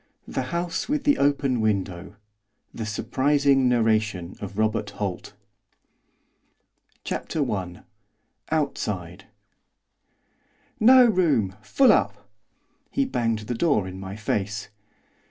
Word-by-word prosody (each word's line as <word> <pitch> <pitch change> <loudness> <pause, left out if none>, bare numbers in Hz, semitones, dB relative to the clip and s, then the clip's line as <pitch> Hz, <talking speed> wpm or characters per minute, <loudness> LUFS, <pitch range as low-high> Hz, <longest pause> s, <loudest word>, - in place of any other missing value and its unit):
The 130 -1 -3
House 175 +6 -2
with 295 -1 0
the 290 0 +3
Open 140 -4 +1
Window 100 -3 -2 0.6
The 110 - -5
Surprising 135 +4 +2
Narration 110 -6 0
of 100 0 -7
Robert 110 -1 0
Holt 100 -3 -5 1.7
CHAPTER 145 -4 -2
I. 90 -3 -5 0.7
OUTSIDE 95 - -2 1.5
'No 250 +3 +7
room! 155 - +2
Full 255 - +4
up!' - - 0 0.6
He 275 - 0
banged 115 - -1
the 115 +3 -4
door 115 - +1
in 95 0 -8
my 95 0 -7
face. 105 0 -3
110 Hz, 100 wpm, -24 LUFS, 100-145 Hz, 1.7 s, No